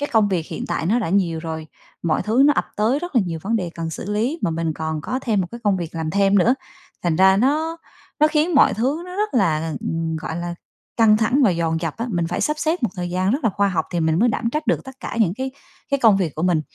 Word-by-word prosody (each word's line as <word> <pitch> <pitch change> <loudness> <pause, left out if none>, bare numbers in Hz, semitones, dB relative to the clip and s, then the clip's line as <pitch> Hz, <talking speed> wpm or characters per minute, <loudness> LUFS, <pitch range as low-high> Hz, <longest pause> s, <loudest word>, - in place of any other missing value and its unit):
cái 290 - -2
công 215 -2 +4
việc 175 -4 -1
hiện - - -5
tại 160 - -1
nó 225 +6 +2
đã 215 - -2
nhiều 170 -3 +1
rồi, 160 -1 -5 0.4
mọi 160 -2 +1
thứ 230 +5 +3
nó 295 - +6
ập - - -1
tới 225 +7 +2
rất 350 -2 -7
là - - +6
nhiều 165 -2 -4
vấn 225 +4 0
đề 180 -5 -3
cần 165 -1 -4
xử 195 +5 -6
lý 240 +10 0
mà - - +1
mình 165 0 -1
còn 160 0 -3
có 255 +11 -3
thêm 215 -5 +1
một 180 - -1
cái 235 0 -8
công 200 -2 +3
việc 170 -2 -5
làm 160 -1 -2
thêm 200 +1 +3
nữa, 230 +7 +4 0.5
thành 170 -3 +1
ra 190 +1 +6
nó 305 +8 +1 0.4
nó 305 - +7
khiến 310 +2 +1
mọi 280 - +5
thứ 270 +9 -1
nó 360 0 -8
rất 420 -3 -1
là, 160 -7 +1
ừm, 165 0 -2
gọi 160 0 -5
là, 175 0 -4 0.4
căng 220 -2 +5
thẳng 225 +6 +2
và 210 - +5
dồn 165 -2 -1
dập 165 -3 -3
á, 230 +2 -3
mình 170 -2 0
phải 175 - -3
sắp 300 0 0
xếp 325 +3 0
một 235 - +2
thời 175 -1 -4
gian 185 +2 0
rất 265 +2 -1
là 225 - +4
khoa 200 +1 +1
học 165 -5 0
thì 175 - 0
mình 160 0 +1
mới 235 +5 +4
đảm 230 0 -1
trách 305 +4 -3
được - - +1
tất 265 0 -12
cả - - -5
những 185 -6 +3
cái 260 +3 -3 0.4
cái 280 - +1
công 220 -5 +6
việc 175 -7 -1
của 155 - -4
mình, 175 -3 +2
200 Hz, 285 wpm, -21 LUFS, 165-250 Hz, 0.5 s, nó